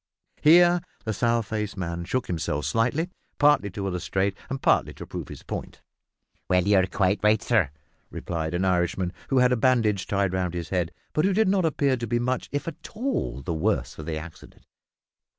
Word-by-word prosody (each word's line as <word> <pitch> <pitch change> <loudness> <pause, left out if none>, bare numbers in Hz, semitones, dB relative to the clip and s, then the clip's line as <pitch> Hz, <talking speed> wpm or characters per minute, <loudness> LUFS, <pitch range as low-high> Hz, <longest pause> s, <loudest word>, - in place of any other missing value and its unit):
Here 175 +2 +6 0.2
the 110 - -1
sour 115 +2 +1
faced 105 -1 -4
man 85 -1 -3
shook 130 +8 -1
himself 75 -4 -2
slightly, 125 - 0 0.3
partly 145 -8 +4
to 100 +1 -5
illustrate 95 +1 -1
and 135 0 -3
partly - - +2
to - - -8
prove - - -6
his - - -10
point. - - -7 0.7
"You're 95 +1 +4
quite 95 +1 +1
right, 105 0 +4
sur," 110 - +2 0.4
remarked 80 -1 -3
an 90 +2 0
Irishman, 90 0 0 0.2
who 135 - +2
had 125 0 +5
a - - +4
bandage 110 -5 +2
tied 100 -2 0
round 90 -2 -1
his 85 -2 -4
head, 90 -3 -1 0.2
but 155 - +2
who 195 +1 +3
did 220 0 +3
not 190 -3 +2
appear 140 -4 +1
to 120 -1 -4
be 120 - +1
much, 125 +2 -1
if 145 +2 -3
at 165 0 -7
all, 235 - -2
the 85 - -2
worse 80 0 -1
of 75 - -7
the 80 -1 -2
accident. 80 +1 -11
105 Hz, 185 wpm, -26 LUFS, 90-130 Hz, 0.7 s, Here